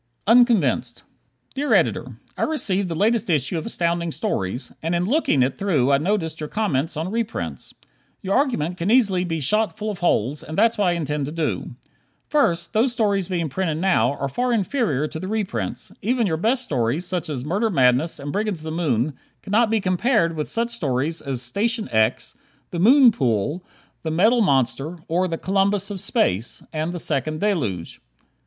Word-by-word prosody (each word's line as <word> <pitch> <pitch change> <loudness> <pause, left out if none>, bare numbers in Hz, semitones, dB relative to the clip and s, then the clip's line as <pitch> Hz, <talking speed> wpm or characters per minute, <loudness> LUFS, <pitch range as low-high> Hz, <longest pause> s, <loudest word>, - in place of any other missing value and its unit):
Unconvinced 205 - +3 0.5
Dear 290 +2 +1
Editor: - - 0 0.2
I - - -6
received 200 - 0
the 165 - -3
latest 215 +4 +1
issue 155 +1 +1
of 160 - -7
Astounding 170 -4 -1
Stories, 95 -1 -3
and 165 +2 -1
in 175 +1 0
looking 215 - +2
it 130 +1 -2
through 150 -10 +2
I 140 - +4
noticed 160 -2 -1
your 150 -1 -5
comments 165 -7 -1
on 165 +4 -3
reprints. 230 0 -4 0.5
Your 195 +1 0
argument 180 - 0
can 170 +3 -2
easily 205 -7 +3
be 165 -3 -2
shot 210 +4 0
full 215 0 -3
of 200 - -8
holes, 145 -4 +1
and 160 - -7
that's 225 +2 +4
what 205 - +3
I 175 - +3
intend 150 -4 -2
to - - -5
do. 160 -1 -3 0.5
First: 170 - +1
Those 235 +4 +3
stories 200 -6 0
being 175 -4 -1
printed 160 +1 -2
now 155 -9 +2
are 140 -1 -3
far 245 - -1
inferior 205 - 0
to 160 - -7
the 185 - -5
reprints. 190 - -3
Even 240 +2 +1
your 165 -5 0
best 240 +9 +1
stories, 135 - -1
such 180 -2 -3
as 135 -4 -4
"Murder 200 +8 0
Madness" 130 - +2
and 145 0 -6
"Brigands 205 -5 -2
of - - -13
the 160 - -5
Moon," 150 -5 0 0.3
cannot 220 +3 +2
be 225 0 +2
compared 185 -2 +1
with 150 -1 -3
such 230 +1 -1
stories 155 - -1
as 130 -3 -3
"Station 220 - -1
X," 110 +1 +1 0.4
"The 170 - -3
Moon 250 +6 +7
Pool," 135 - -1 0.4
"The 160 - -3
Metal 215 +10 +3
Monster," 140 - +1
or 180 +3 +1
"The 165 -2 -3
Columbus 195 +2 0
of 195 -3 -4
Space" 100 +6 0
and 155 +2 -2
"The 175 - -5
Second 155 -1 -2
Deluge." 120 - -2
175 Hz, 185 wpm, -22 LUFS, 150-210 Hz, 0.5 s, Moon